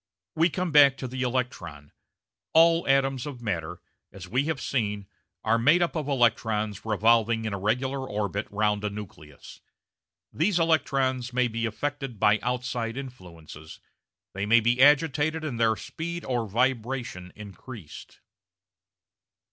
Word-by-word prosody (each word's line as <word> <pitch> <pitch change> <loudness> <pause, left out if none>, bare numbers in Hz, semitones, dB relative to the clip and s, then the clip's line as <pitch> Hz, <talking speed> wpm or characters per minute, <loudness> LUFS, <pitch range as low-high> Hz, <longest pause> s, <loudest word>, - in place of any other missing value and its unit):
We 165 +3 +3
come 180 0 -3
back 140 -2 +6
to 130 - -5
the 130 +1 -5
electron: 120 - -3 0.6
all 165 +1 +5
atoms 135 -1 +1
of 130 -5 -8
matter, 90 -5 -4 0.3
as 95 -1 -10
we 125 +8 0
have 160 -3 -2
seen, 105 -7 -2 0.4
are 115 +1 +2
made 150 +9 +4
up 175 - -2
of 155 -3 -3
electrons 110 -5 0
revolving 110 +1 +2
in 110 - -3
a 100 - -3
regular 130 +6 -1
orbit 105 0 -3
round 105 0 0
a 105 - 0
nucleus. 85 -8 -11 0.7
These 175 +4 +1
electrons 135 -6 0
may 125 0 +2
be 115 0 -2
affected 135 0 -4
by 105 +2 +4
out 125 0 -2
side 120 -1 -3
influences, 85 - -10 0.5
they 100 +2 -3
may 115 +2 +6
be 120 +2 +1
agitated 150 +2 +3
and 130 -7 -4
their 110 -1 +3
speed 170 +8 -6
or 120 -3 -1
vibration 120 -5 -2
increased. 105 - -11
120 Hz, 140 wpm, -26 LUFS, 105-135 Hz, 0.7 s, back